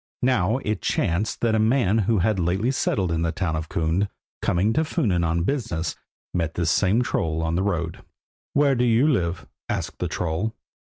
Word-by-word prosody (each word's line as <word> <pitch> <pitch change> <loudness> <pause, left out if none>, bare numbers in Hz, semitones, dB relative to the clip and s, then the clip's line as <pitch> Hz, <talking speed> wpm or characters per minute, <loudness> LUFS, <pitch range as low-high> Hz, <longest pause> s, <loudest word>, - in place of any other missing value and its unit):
Now 120 -3 +2
it 105 0 -1
chanced 85 +6 0
that 115 -2 +2
a 110 - +3
man 115 -2 +3
who 110 +2 +2
had 100 +2 +1
lately 95 +8 +1
settled 95 -9 0
in 80 0 0
the 85 0 +1
town 80 -1 -2
of 80 0 -4
Kund, 85 +5 0 0.3
coming 100 +6 +2
to 155 - +2
Funen 95 - 0
on 85 0 +1
business, 100 - -2 0.4
met 80 -2 -1
this 85 -2 +1
same 105 +7 +3
troll 80 -8 -1
on 80 0 -1
the 90 - +1
road. 85 -5 -2 0.5
"Where 140 -1 +4
do 125 -1 +1
you 120 +4 +4
live?" 85 - 0 0.2
asked - - -3
the - - -1
troll. 90 +7 -2
95 Hz, 190 wpm, -24 LUFS, 85-115 Hz, 0.5 s, Where